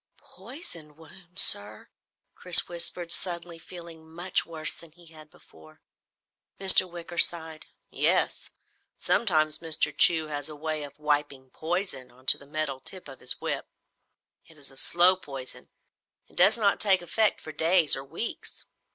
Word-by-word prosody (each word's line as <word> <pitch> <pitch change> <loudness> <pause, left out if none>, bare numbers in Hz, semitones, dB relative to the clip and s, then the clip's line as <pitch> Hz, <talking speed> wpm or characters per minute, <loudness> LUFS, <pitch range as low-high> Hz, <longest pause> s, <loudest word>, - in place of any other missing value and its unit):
"Poisoned 185 - -12
wound, 180 +3 -19
sir?" 105 +1 +3 0.4
Chris 180 -2 +7
whispered, 170 0 -3
suddenly 170 -2 -5
feeling 165 -2 -13
much 175 +3 -2
worse 160 -2 -3
than 170 -2 -13
he 175 0 -20
had 155 -1 -16
before. 80 - -21 0.8
Mr. 190 -1 +7
Wicker 170 0 -7
sighed. 160 -2 0 0.2
"Yes. - - -1 0.5
Sometimes 155 -8 0
Mr. 155 -2 0
Chew 160 -2 +4
has 145 -1 -6
a 155 - -10
way 155 0 -5
of 145 -1 -11
wiping 145 -3 -3
poison 165 -6 -5
onto 130 +2 +2
the 140 - -17
metal 150 -3 -5
tip 185 +6 -8
of 135 -2 -13
his - - -2
whip. - - -5 0.8
It 160 - -20
is 140 -1 -6
a - - -17
slow 175 +5 +3
poison 135 -7 -10 0.6
it - - -25
does 195 +6 +4
not 205 -3 0
take 190 -3 +3
effect 215 +5 0
for 155 - -10
days 160 +1 +3
or 135 - -7
weeks. 165 +11 -7
160 Hz, 150 wpm, -25 LUFS, 150-175 Hz, 0.8 s, Chris